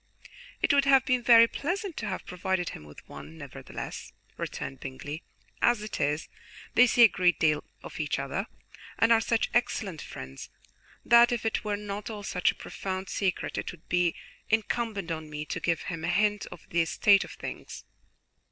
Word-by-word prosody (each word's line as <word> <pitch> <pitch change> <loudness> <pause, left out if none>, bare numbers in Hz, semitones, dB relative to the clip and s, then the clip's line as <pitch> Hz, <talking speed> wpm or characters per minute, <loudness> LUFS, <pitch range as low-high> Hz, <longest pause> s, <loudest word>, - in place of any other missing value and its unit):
"It - - +4
would 280 -1 +4
have 270 -1 +5
been 250 -1 +2
very 230 -1 +8
pleasant 360 - -3
to 220 - -3
have 190 - -4
provided 180 0 -2
him 75 - -9
with 75 0 -14
one, 75 +3 -10
nevertheless," - - -8 0.2
returned 135 - -5
Bingley. 145 +4 -6 0.4
"As 235 -3 +3
it 215 - -5
is, 150 +2 0 0.5
they 250 +1 +7
see 240 +1 +6
a - - +11
great 180 -4 +2
deal 155 -2 +2 0.2
of - - -9
each 150 -1 -1
other, 140 +10 -3 0.5
and 225 - +4
are 225 -1 +6
such 225 0 0
excellent 200 -8 0
friends, 65 +1 -9 0.6
that 235 0 +7
if 235 -2 -2
it 225 - 0
were 210 -1 -1
not 205 0 -5
all 210 -2 -6
such 180 -2 +1
a - - -16
profound 190 0 -5
secret 190 -3 -1
it - - -4
would 170 -3 -16
be 175 -1 +2 0.3
incumbent 220 -4 -1
on 160 -1 -4
me 150 0 -5
to - - -4
give 170 -2 0
him 165 -2 -5
a - - -1
hint 205 +3 +1
of - - -11
the 170 -1 +3
state 200 +4 +4
of - - -10
things." - - -8
195 Hz, 185 wpm, -28 LUFS, 160-230 Hz, 0.6 s, a